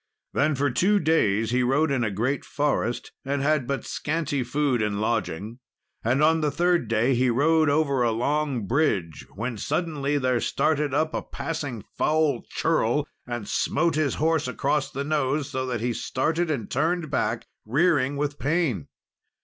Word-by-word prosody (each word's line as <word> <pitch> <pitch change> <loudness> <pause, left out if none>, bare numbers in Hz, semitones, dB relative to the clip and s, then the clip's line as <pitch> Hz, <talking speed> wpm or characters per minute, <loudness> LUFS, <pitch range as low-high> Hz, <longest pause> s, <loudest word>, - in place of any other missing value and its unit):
Then 150 0 +2
for 140 +1 +1
two 195 +11 +3
days 115 - +2
he 125 +1 +2
rode 140 +5 +2
in 130 -3 +1
a 110 - +1
great 120 +8 -1
forest, 140 -5 -1
and 140 0 -1
had 145 -3 +1
but 140 0 -2
scanty 150 -3 -2
food 125 0 0
and 105 -1 -1
lodging, 110 0 -2 0.4
and 130 +6 +2
on 160 +1 +4
the 150 - +2
third 175 +3 +1
day 120 +5 +2
he 125 +1 +2
rode 155 +5 +3
over 145 -3 +2
a 120 - +3
long 135 0 0
bridge, 100 - 0
when 115 +2 -4
suddenly 145 - -1
there 130 -3 +1
started 150 -2 +1
up 155 +3 0
a - - -1
passing 140 -9 -5 0.2
foul 155 -5 +2
churl, 150 -2 +1 0.2
and 120 -4 -4
smote 170 -1 +1
his 150 -3 0
horse 160 -2 +1
across 140 +3 0
the 140 - -4
nose, 145 -1 0
so 130 0 -2
that 120 -3 -2
he 120 0 0
started 160 +9 -1
and 130 -9 -3
turned 160 +2 0
back, 115 -3 -1 0.2
rearing 140 +2 +2
with 145 0 -2
pain. 145 - 0
140 Hz, 165 wpm, -25 LUFS, 120-155 Hz, 0.4 s, on